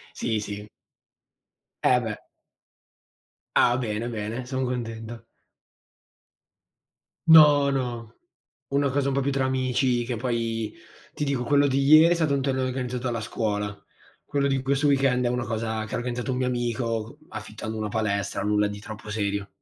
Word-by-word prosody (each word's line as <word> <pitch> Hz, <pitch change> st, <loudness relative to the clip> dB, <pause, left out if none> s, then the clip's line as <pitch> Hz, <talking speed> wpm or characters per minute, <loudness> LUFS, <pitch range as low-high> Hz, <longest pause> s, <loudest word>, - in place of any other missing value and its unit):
Sì, 110 Hz, -3 st, -1 dB
sì. 105 Hz, 0 st, -6 dB, 1.2 s
Eh, 125 Hz, -1 st, +4 dB
beh. 110 Hz, -3 st, -5 dB, 1.3 s
Ah, 120 Hz, 0 st, +5 dB
bene, 115 Hz, -1 st, -2 dB
bene. 115 Hz, +2 st, -4 dB
Son 130 Hz, 0 st, -2 dB
contento. 115 Hz, -2 st, -5 dB, 2.0 s
No, 150 Hz, -3 st, +8 dB
no. 120 Hz, -4 st, -3 dB, 0.5 s
Una 140 Hz, 0 st, +2 dB
cosa 140 Hz, 0 st, 0 dB
un 135 Hz, -, 0 dB
po' 140 Hz, -, +2 dB
più 140 Hz, +1 st, 0 dB
tra 135 Hz, -1 st, 0 dB
amici, 130 Hz, -1 st, +1 dB
che 120 Hz, 0 st, -3 dB
poi 115 Hz, -2 st, -2 dB, 0.4 s
ti -, -, -5 dB
dico, 135 Hz, -3 st, -1 dB
quello 145 Hz, +3 st, +4 dB
di 135 Hz, 0 st, +1 dB
ieri 155 Hz, +3 st, +8 dB
è -, -, +4 dB
stato 160 Hz, -4 st, +1 dB
un 135 Hz, -, 0 dB
torneo 130 Hz, -1 st, 0 dB
organizzato 125 Hz, -1 st, -3 dB
dalla 120 Hz, -3 st, -1 dB
scuola. 105 Hz, -2 st, -2 dB, 0.5 s
Quello 140 Hz, -1 st, 0 dB
di 135 Hz, -1 st, +1 dB
questo 140 Hz, +2 st, +1 dB
weekend 135 Hz, -3 st, +2 dB
è -, -, +3 dB
una 125 Hz, 0 st, -1 dB
cosa 110 Hz, -1 st, -2 dB
che 110 Hz, -, -7 dB
ha -, -, 0 dB
organizzato 125 Hz, +1 st, -3 dB
un 125 Hz, -, -1 dB
mio 130 Hz, -, 0 dB
amico 120 Hz, 0 st, -2 dB
c -, -, -22 dB
affittando 110 Hz, 0 st, -6 dB
una 110 Hz, -1 st, -2 dB
palestra, 100 Hz, -2 st, -1 dB
nulla 105 Hz, 0 st, +2 dB
di 105 Hz, 0 st, -5 dB
troppo 105 Hz, 0 st, -9 dB
serio. 100 Hz, -1 st, -2 dB
120 Hz, 160 wpm, -25 LUFS, 110-135 Hz, 2.0 s, No